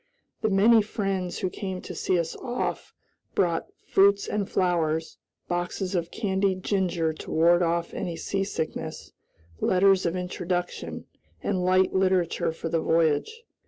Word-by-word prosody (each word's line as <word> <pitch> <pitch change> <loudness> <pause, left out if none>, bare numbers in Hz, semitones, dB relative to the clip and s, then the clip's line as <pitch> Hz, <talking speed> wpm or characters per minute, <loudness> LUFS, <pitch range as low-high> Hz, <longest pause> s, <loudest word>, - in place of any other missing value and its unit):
The 220 - +2
many 215 +3 +6
friends 195 -4 -2
who 185 - -2
came 190 -3 -4
to - - -7
see 185 - 0
us 165 -1 -2
off 245 -1 -3 0.4
brought 170 -3 +1 0.2
fruits 200 +1 +4
and 205 -2 -2
flowers, 160 -3 0 0.3
boxes 175 +2 -2
of 170 -2 -1
candied 190 -2 0
ginger 175 -5 0
to - - -10
ward 170 +2 +4
off 170 0 0 0.2
seasickness, 160 -5 -3 0.5
letters 190 0 +4
of 170 - -1
introduction, 180 0 -3 0.4
and 185 -3 0
light 185 +1 +3
literature 185 -4 +1
for 165 - -6
the 165 0 0
voyage. 165 - +1
185 Hz, 130 wpm, -26 LUFS, 170-195 Hz, 0.5 s, many